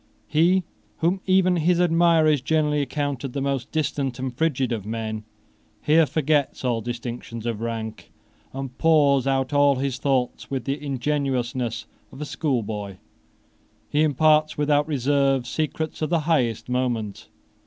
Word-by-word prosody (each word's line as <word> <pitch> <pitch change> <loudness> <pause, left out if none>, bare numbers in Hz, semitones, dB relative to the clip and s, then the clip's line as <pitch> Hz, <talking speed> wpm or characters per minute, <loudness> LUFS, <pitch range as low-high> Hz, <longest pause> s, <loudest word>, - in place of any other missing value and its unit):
He 175 +4 +3 0.3
whom 180 +4 0
even 185 -1 +4
his 170 +2 +2
admirers 165 -4 +4
generally 150 +1 +1
accounted 140 -2 -3
the 140 - -2
most 135 -3 -2
distant 140 -4 -1
and 130 -1 -4
frigid 135 -4 0
of 110 -4 -2
men 110 0 -4 0.5
here 155 +4 +4
forgets 150 -3 0
all 120 -2 0
distinctions 120 0 -6
of 115 -2 -3
rank, 115 -1 -5 0.4
and 135 -1 -6
pours 145 -5 +4
out 135 0 0
all 145 -1 +4
his 130 -1 -2
thoughts 130 -3 -1
with 135 -3 -3
the 140 +2 -3
ingenuousness 130 -4 -2 0.3
of 135 - -12
a 150 - -4
schoolboy. 110 - -3 0.9
He 150 - +2
imparts 155 +1 +3
without 145 0 +2
reserve 140 -2 +1
secrets 155 +3 -3
of 155 - 0
the 170 -1 +2
highest 135 -9 0
moment. 120 -5 -2
140 Hz, 140 wpm, -24 LUFS, 125-155 Hz, 0.9 s, even